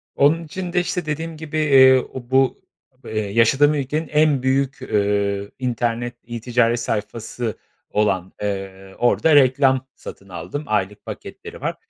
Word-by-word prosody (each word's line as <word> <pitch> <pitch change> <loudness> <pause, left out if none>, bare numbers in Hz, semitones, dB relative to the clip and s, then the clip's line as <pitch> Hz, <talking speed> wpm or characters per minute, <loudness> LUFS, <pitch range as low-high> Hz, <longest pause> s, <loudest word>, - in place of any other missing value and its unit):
Onun 155 +4 +3
için 175 +2 -6
de, 180 - +3
işte, 180 -1 -2
dediğim 160 +1 -4
gibi, 155 0 -5
eee, 135 -4 +6
o 120 -2 -8
bu, 130 -1 +2 0.4
eee, 110 - -3
yaşadığım 115 +8 +3
ülkenin 150 +3 -2
en 150 -3 +2
büyük, 135 +1 0
eee, 100 -1 0
internet 120 -1 -2
e-ticaret 120 0 0
sayfası 115 +1 -4 0.3
olan, 95 -3 0
eee, 95 -1 -5
orada 145 +5 +3
reklam 130 -1 +4
satın 100 - -11
aldım, 90 - -6
aylık 105 -1 -2
paketleri - - -9
var. - - -2
125 Hz, 135 wpm, -21 LUFS, 105-145 Hz, 0.4 s, eee